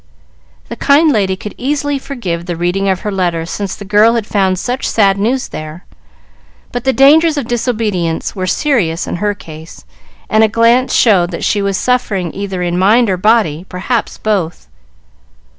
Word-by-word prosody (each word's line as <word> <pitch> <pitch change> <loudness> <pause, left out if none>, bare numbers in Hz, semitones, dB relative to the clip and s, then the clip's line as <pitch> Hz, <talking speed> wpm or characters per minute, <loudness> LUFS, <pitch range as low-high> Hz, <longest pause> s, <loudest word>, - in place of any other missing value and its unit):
The - - -5
kind 300 +3 +3
lady 195 -6 +1
could 205 +2 -8
easily 285 +1 -1
forgive 185 -12 -5
the 175 - -3
reading 180 +4 -1
of 185 -1 -1
her 210 - -3
letter 175 -4 -1
since 195 +2 -4
the 205 - -10
girl 210 +3 +4
had 230 -3 -1
found 190 -4 0
such 250 +7 -3
sad 200 -3 +2
news 250 +5 -1
there, 155 +3 -8 0.9
but 245 0 -5
the 265 - +3
dangers 300 +4 +4
of 280 - -2
disobedience 215 -9 -2
were 185 -1 -3
serious 185 - 0
in - - -4
her 205 +2 -1
case, 160 - -12 0.4
and 215 +1 +3
a - - +5
glance 230 +4 +2
showed 190 -7 +4
that 170 - -6
she 205 - +1
was 200 -1 -1
suffering 205 -9 -1
either 195 -2 -4
in 175 0 -1
mind 215 +3 +3
or 185 - 0
body 205 -6 +2
perhaps 210 +6 -2
both. 185 - -2
205 Hz, 175 wpm, -14 LUFS, 180-240 Hz, 0.9 s, a